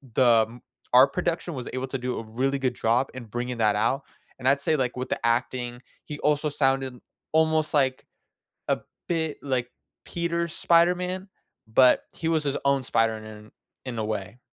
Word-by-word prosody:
the 115 -4 +5
m 120 +1 -13 0.3
art 135 +2 +7
production 170 -1 -2
was 125 -2 -5
able 130 +1 -2
to 135 - -3
do 125 0 -3
a 115 - -6
really 130 +5 -1
good 130 -2 0
job 120 +4 +1
in 130 -2 -7
bringing 120 +3 -4
that 110 -2 +3
out, 115 +6 +1 0.4
and 130 - -2
I'd 140 +1 +4
say, 155 - +2
like, 130 -4 -1
with 125 - -4
the - - -1
acting, 120 +1 -1 0.2
he 145 -1 -7
also 150 +1 +1
sounded 135 -3 0 0.3
almost, 160 -1 +2
like 130 -3 +1 0.6
a - - +2 0.3
bit 160 -3 -1
like 130 -3 -1 0.4
Peter's 170 -1 -2
Spider-Man, 180 +3 +2 0.4
but 125 +3 +5
he 165 - -4
was 160 -2 +2
his 140 -1 -1
own 140 -1 +3
Spider-Man 110 -2 -1 0.4
in 125 -3 -5
a - - 0
way. 110 +2 -4
130 Hz, 175 wpm, -26 LUFS, 120-150 Hz, 0.6 s, art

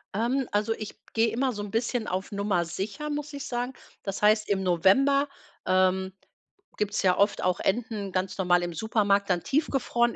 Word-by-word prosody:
Ähm, 245 +4 0
also, 210 +2 +1
ich 215 -1 -7 0.2
gehe 225 0 +3
immer 255 +3 0
so 205 -1 -5
'n 205 - -7
bisschen 230 0 -1
auf 185 +1 -3
Nummer 200 -4 0
Sicher, 195 - -4
muss 295 0 -4
ich 280 -1 -5
sagen. 245 +1 -2 0.3
Das 195 0 -4
heißt, 215 0 +4
im 195 -1 +1
November, 265 - +4 0.4
ähm, 185 0 +2 0.6
gibt's 205 0 -1
ja 185 -1 +3
oft 200 +1 +2
auch 180 -1 +1
Enten 210 -2 -1
ganz 185 0 -1
normal 180 -1 +3
im 175 - -3
Supermarkt 200 +1 +1
dann 175 -2 +1
tiefgefroren, 265 -5 +1
205 Hz, 175 wpm, -27 LUFS, 190-240 Hz, 0.6 s, heißt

